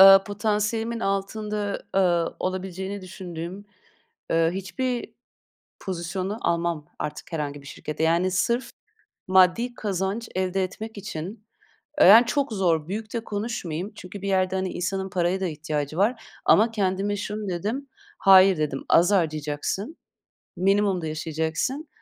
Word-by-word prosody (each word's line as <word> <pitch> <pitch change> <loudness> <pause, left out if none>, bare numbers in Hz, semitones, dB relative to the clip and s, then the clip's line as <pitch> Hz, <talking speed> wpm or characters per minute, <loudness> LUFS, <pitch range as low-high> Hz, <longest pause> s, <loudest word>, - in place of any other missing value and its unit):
ııı, 195 0 +10
potansiyelimin 215 +2 -1
altında, 205 +1 -2
eee, 175 -3 +2
olabileceğini 190 +1 -3
düşündüğüm, 180 +1 -7 0.7
eee, 165 0 +3
hiçbir 240 +6 -3 0.7
pozisyonu 185 +3 -3
almam 170 -5 0
artık 150 - -6
herhangi 145 -3 -3
bir - - -15
şirkette. 150 +2 -5
Yani, 170 +3 +3
sırf 235 +7 0 0.6
maddi 190 +7 +4
kazanç 200 +2 -2
elde 185 0 0
etmek 215 +3 -7
için, 200 +3 -6 0.5
eee, - - +8
yani, 225 +5 +9
çok 275 0 0
zor 170 -6 +1
büyük 215 +3 -5
de 235 - 0
konuşmayayım. 205 -4 -4
Çünkü 195 -1 -9
bir 200 - -2
yerde, 190 0 +2
hani, 185 0 -1
insanın 190 +2 -2
paraya 180 +1 0
da 190 - 0
ihtiyacı 150 -2 -3
var. 225 +3 +1 0.2
Ama 220 +3 +5
kendime 200 -1 0
şunu 210 0 -4
dedim, 215 +11 -3 0.3
"Hayır." 190 -1 +7
dedim, 150 -3 -2
"Az 175 +4 +5
harcayacaksın, 155 - -1 0.6
minimumda 195 -2 +2
yaşayacaksın 160 - -2
190 Hz, 130 wpm, -25 LUFS, 170-210 Hz, 0.7 s, ııı